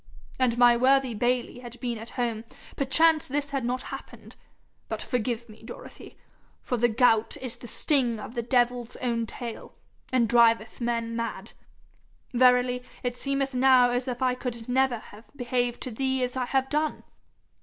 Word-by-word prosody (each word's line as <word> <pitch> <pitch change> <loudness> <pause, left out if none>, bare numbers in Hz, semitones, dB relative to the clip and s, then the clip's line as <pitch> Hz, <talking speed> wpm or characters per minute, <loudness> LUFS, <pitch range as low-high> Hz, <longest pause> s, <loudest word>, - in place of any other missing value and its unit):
An' 245 -2 +2
my 240 -1 +6
worthy 260 0 +3
Bayly 245 +2 -1
had 245 -1 -10
been 240 -3 -3
at 225 +1 -8
home, 230 -3 -1 0.3
perchance 310 +3 +3
this 285 +1 -2
had 275 -2 -1
not 250 +2 -2
happened; - - -10 0.5
but - - -3
forgive 235 -2 -2
me, 215 -1 -15
Dorothy, - - -11 0.5
for 250 - -1
the 240 0 +2
gout 225 -1 +3
is 255 -2 -4
the 240 - -10
sting 245 -3 +1
of 215 - -8
the 240 - -2
devil's 245 0 0
own 235 -2 -2
tail, 235 0 -8 0.4
and 250 -3 +3
driveth 230 0 +3
men 230 -1 -1
mad. 230 0 -4 0.8
Verily, 250 0 +4 0.2
it 245 -1 -2
seemeth 275 +1 -2
now 255 -1 +5
as 245 +1 -1
if 250 0 -3
I 255 -1 +3
could 245 -2 -5
never 260 -1 +2
have 215 +1 -14
behaved 245 -2 -1
to 255 - -4
thee 265 +2 -1
as 250 0 -2
I 255 -1 -1
have 265 +1 0
done. 300 +1 -1
245 Hz, 165 wpm, -27 LUFS, 235-260 Hz, 0.8 s, my